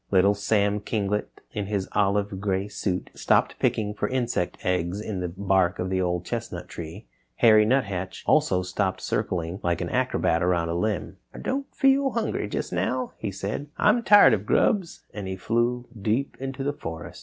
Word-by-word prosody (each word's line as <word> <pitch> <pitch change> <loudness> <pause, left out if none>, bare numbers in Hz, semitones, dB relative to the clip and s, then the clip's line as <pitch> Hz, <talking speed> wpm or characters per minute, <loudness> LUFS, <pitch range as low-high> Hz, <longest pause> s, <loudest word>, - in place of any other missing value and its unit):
Little 100 +1 +4
Sam 105 0 +1
Kinglet, 105 -1 -2
in 105 -2 -3
his 100 -2 -1
olive 100 -1 0
gray 100 -1 0
suit, 95 -3 -3
stopped - - +1
picking 105 -1 0
for 105 - -2
insect 120 -8 -1
eggs 90 +1 0
in 105 -3 -4
the 90 - -2
bark 95 0 +1
of 90 +1 -3
the 95 0 +1
Old 90 -1 -1
Chestnut 90 -7 -5
Tree. 80 -3 -8 0.3
Harry 110 -2 +6
Nuthatch 100 -8 -1
also 90 0 +3
stopped 95 +1 -1
circling 85 +1 -2
like 85 -1 0
an - - -3
acrobat 85 +1 +1
around 85 -2 +1
a - - -1
limb. 100 +3 -2 0.2
"I - - -8
don't 275 +1 -2
feel 270 -1 +4
hungry 225 - -1
just 100 - -4
now," 125 +8 -1
he 105 - -3
said, 100 +9 -4
"I'm 215 +4 +4
tired 205 - +7
of 105 -1 -1
grubs," 190 -6 +1
and 100 -2 -5
he 95 - -3
flew 120 +5 0 0.2
deep 115 +7 0
into 135 0 -4
the 145 +1 0
forest. 80 - -7
100 Hz, 180 wpm, -25 LUFS, 90-115 Hz, 0.3 s, tired